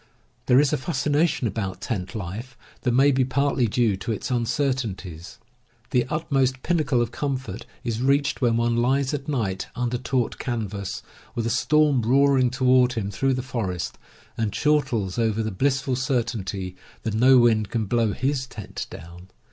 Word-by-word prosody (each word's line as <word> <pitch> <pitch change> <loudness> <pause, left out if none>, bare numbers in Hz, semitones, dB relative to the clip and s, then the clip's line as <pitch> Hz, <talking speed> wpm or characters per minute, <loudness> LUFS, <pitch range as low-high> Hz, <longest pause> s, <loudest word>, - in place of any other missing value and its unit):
There 125 - +6
is 145 0 +3
a - - +2
fascination 150 0 +1
about 100 -3 -3
tent 105 -4 -4
life 110 +6 -6 0.2
that 125 - +1
may 135 +4 +5
be 130 -1 +2
partly 135 -1 +1
due 110 -1 +2
to 95 +4 -4
its 110 +4 -3
uncertainties. 115 - -2 0.5
The 125 -1 +2
utmost 135 -4 0
pinnacle 150 -8 +2
of 115 - -5
comfort 130 -6 -4 0.2
is 115 -1 -2
reached 140 +2 +1
when 120 -2 +3
one 115 0 +1
lies 130 +3 +1
at 145 0 -4
night 110 -10 -2
under 125 0 -1
taut 125 -1 -1
canvas, 105 -5 -4 0.3
with 115 - -1
a 115 - 0
storm 150 -2 +3
roaring 135 +2 +4
toward 125 -1 +3
him 105 -4 -3
through 135 +4 +1
the 130 - -3
forest, 100 -9 -3 0.4
and 110 -2 0
chortles 120 -7 +1
over 110 -1 +1
the 110 - -2
blissful 135 +5 0
cer 130 -1 +1
tainty 95 -5 -5 0.3
that 110 - -2
no 130 +4 +6
wind 110 -4 +4
can 115 -2 -1
blow 115 0 +1
his 130 0 -1
tent 105 -5 -7
down. 85 +3 -11
125 Hz, 165 wpm, -24 LUFS, 110-135 Hz, 0.5 s, There